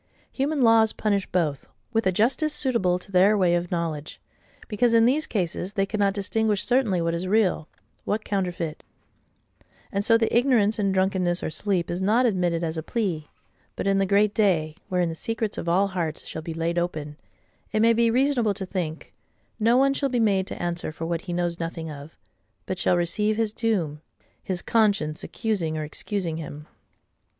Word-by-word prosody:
Human 280 Hz, 0 st, 0 dB
laws 225 Hz, -1 st, +5 dB
punish 200 Hz, -3 st, 0 dB
both, 155 Hz, -6 st, -1 dB, 0.3 s
with 225 Hz, -2 st, +1 dB
a -, -, +4 dB
justice 265 Hz, -, +1 dB
suitable 215 Hz, -10 st, +1 dB
to 190 Hz, +2 st, -14 dB
THEIR 195 Hz, +3 st, +5 dB
way 180 Hz, -3 st, +3 dB
of 175 Hz, 0 st, 0 dB
knowledge;—because, 170 Hz, +7 st, -3 dB
in 230 Hz, 0 st, +6 dB
these 290 Hz, +6 st, +2 dB
cases, 185 Hz, -1 st, -2 dB
they 195 Hz, -2 st, +1 dB
cannot 200 Hz, -1 st, 0 dB
distinguish 210 Hz, 0 st, 0 dB
certainly 240 Hz, -8 st, +2 dB
what 165 Hz, 0 st, 0 dB
is 170 Hz, +2 st, -2 dB
real, 190 Hz, -6 st, +2 dB, 0.4 s
what 215 Hz, +1 st, -2 dB
counterfeit: 180 Hz, -5 st, -3 dB, 1.1 s
and 200 Hz, 0 st, -1 dB
so 230 Hz, +1 st, +5 dB
the 225 Hz, 0 st, 0 dB
ignorance 235 Hz, -4 st, +3 dB
in 200 Hz, -1 st, +1 dB
drunkenness 185 Hz, -2 st, +1 dB
or -, -, -2 dB
sleep 180 Hz, -2 st, -1 dB
is 175 Hz, +2 st, -3 dB
not 220 Hz, +6 st, +3 dB
admitted 175 Hz, -6 st, +1 dB
as 160 Hz, 0 st, -2 dB
a -, -, -1 dB
plea. 170 Hz, -5 st, -2 dB, 0.5 s
But -, -, -4 dB
in 195 Hz, 0 st, +2 dB
the 195 Hz, -, +1 dB
Great 200 Hz, +1 st, +3 dB
Day, 170 Hz, -8 st, +2 dB, 0.2 s
wherein 180 Hz, -2 st, +1 dB
the -, -, -4 dB
secrets 225 Hz, +5 st, -3 dB
of 170 Hz, -, -3 dB
all 195 Hz, +3 st, +3 dB
hearts 170 Hz, -4 st, -3 dB
shall 160 Hz, -, -6 dB
be 160 Hz, 0 st, -6 dB
laid 165 Hz, +1 st, 0 dB
open, 155 Hz, -4 st, -4 dB, 0.5 s
it 215 Hz, -, 0 dB
may 230 Hz, +1 st, +5 dB
be 230 Hz, 0 st, +3 dB
reasonable 245 Hz, -4 st, +2 dB
to 190 Hz, -, -4 dB
think, 170 Hz, -4 st, -5 dB, 0.5 s
no 230 Hz, +3 st, +4 dB
one 275 Hz, +1 st, +4 dB
shall 275 Hz, 0 st, -1 dB
be 245 Hz, -2 st, 0 dB
made 195 Hz, -4 st, +2 dB
to -, -, -6 dB
answer 175 Hz, -2 st, -3 dB
for 160 Hz, +1 st, -6 dB
what 170 Hz, 0 st, -2 dB
he 180 Hz, -, -7 dB
knows 175 Hz, -1 st, -1 dB
nothing 165 Hz, -1 st, -4 dB
of; 145 Hz, +2 st, -11 dB, 0.5 s
but 185 Hz, -, -4 dB
shall 180 Hz, -, +2 dB
receive 210 Hz, +5 st, +1 dB
his 225 Hz, -2 st, 0 dB
doom, 175 Hz, -11 st, -1 dB, 0.4 s
his 180 Hz, -2 st, -3 dB
conscience 200 Hz, -9 st, +1 dB
accusing 185 Hz, -9 st, -2 dB
or 155 Hz, -, -2 dB
excusing 165 Hz, +2 st, -3 dB
him. 150 Hz, -2 st, -8 dB
190 Hz, 185 wpm, -25 LUFS, 170-220 Hz, 1.1 s, in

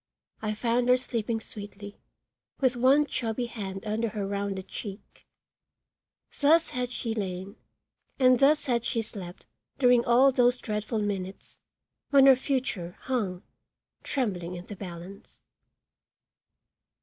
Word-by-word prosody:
I 215 Hz, -1 st, -2 dB
found 240 Hz, +2 st, +1 dB
her 250 Hz, -, +6 dB
sleeping 230 Hz, -3 st, -2 dB
sweetly, 205 Hz, -1 st, -9 dB, 0.6 s
with 260 Hz, -3 st, +2 dB
one 265 Hz, +5 st, +4 dB
chubby 240 Hz, -3 st, -2 dB
hand 195 Hz, -5 st, -6 dB
under 220 Hz, +2 st, -1 dB
her 210 Hz, -2 st, -3 dB
rounded 200 Hz, -1 st, -3 dB
cheek. 200 Hz, -2 st, -9 dB, 1.1 s
Thus 315 Hz, +3 st, +4 dB
had 250 Hz, -1 st, -2 dB
she 230 Hz, -2 st, -3 dB
lain 190 Hz, -1 st, -4 dB, 0.6 s
and 255 Hz, -2 st, +5 dB
thus 295 Hz, +2 st, +4 dB
had 235 Hz, -3 st, +1 dB
she 235 Hz, -1 st, -1 dB
slept 185 Hz, -4 st, -9 dB, 0.3 s
during 245 Hz, -3 st, +5 dB
all 250 Hz, +3 st, +5 dB
those 250 Hz, -1 st, +3 dB
dreadful 215 Hz, -1 st, -2 dB
minutes, 195 Hz, -2 st, -5 dB, 0.5 s
when 275 Hz, -1 st, +6 dB
her 270 Hz, -1 st, +9 dB
future 250 Hz, -, -2 dB
hung, 205 Hz, -8 st, -2 dB, 0.6 s
trembling 180 Hz, -10 st, -2 dB
in 175 Hz, 0 st, -8 dB
the 205 Hz, -, -8 dB
balance. 185 Hz, 0 st, -10 dB
225 Hz, 125 wpm, -28 LUFS, 200-250 Hz, 1.1 s, her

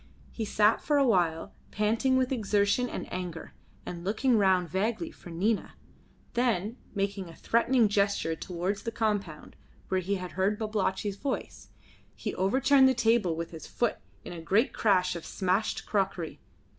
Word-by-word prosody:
He 225 Hz, -, -4 dB
sat 210 Hz, +1 st, +3 dB
for 295 Hz, -, +1 dB
awhile 180 Hz, -, +2 dB, 0.2 s
panting 225 Hz, +5 st, +1 dB
with 255 Hz, 0 st, +1 dB
exertion 210 Hz, 0 st, +1 dB
and -, -, -5 dB
anger, 180 Hz, -3 st, -5 dB, 0.3 s
and 170 Hz, -1 st, -6 dB
looking 225 Hz, +6 st, +2 dB
round 190 Hz, -4 st, +3 dB
vaguely 220 Hz, -, -1 dB
for 175 Hz, -, -13 dB
Nina; 195 Hz, +6 st, -1 dB, 0.6 s
then 235 Hz, -2 st, 0 dB, 0.2 s
making 195 Hz, -2 st, -2 dB
a 165 Hz, -, -12 dB
threatening 235 Hz, 0 st, +3 dB
gesture 200 Hz, -5 st, +1 dB
towards 185 Hz, +4 st, -3 dB
the 230 Hz, -, -4 dB
compound, 205 Hz, -9 st, -2 dB, 0.3 s
where 190 Hz, -, +1 dB
he 195 Hz, +3 st, -1 dB
had 180 Hz, -1 st, -5 dB
heard 195 Hz, +3 st, 0 dB
Babalatchi's 205 Hz, -2 st, -1 dB
voice, 275 Hz, +3 st, -4 dB, 0.5 s
he -, -, -4 dB
overturned 265 Hz, +8 st, +4 dB
the 260 Hz, -, +1 dB
table 225 Hz, -7 st, +2 dB
with 165 Hz, +1 st, -5 dB
his 160 Hz, -2 st, -9 dB
foot 240 Hz, -2 st, -1 dB, 0.3 s
in -, -, -6 dB
a 170 Hz, -, -7 dB
great 200 Hz, +9 st, +2 dB
crash 185 Hz, -5 st, +2 dB
of 170 Hz, -, -6 dB
smashed 190 Hz, +2 st, -1 dB
crockery. 190 Hz, -5 st, -1 dB
200 Hz, 155 wpm, -29 LUFS, 180-230 Hz, 0.6 s, overturned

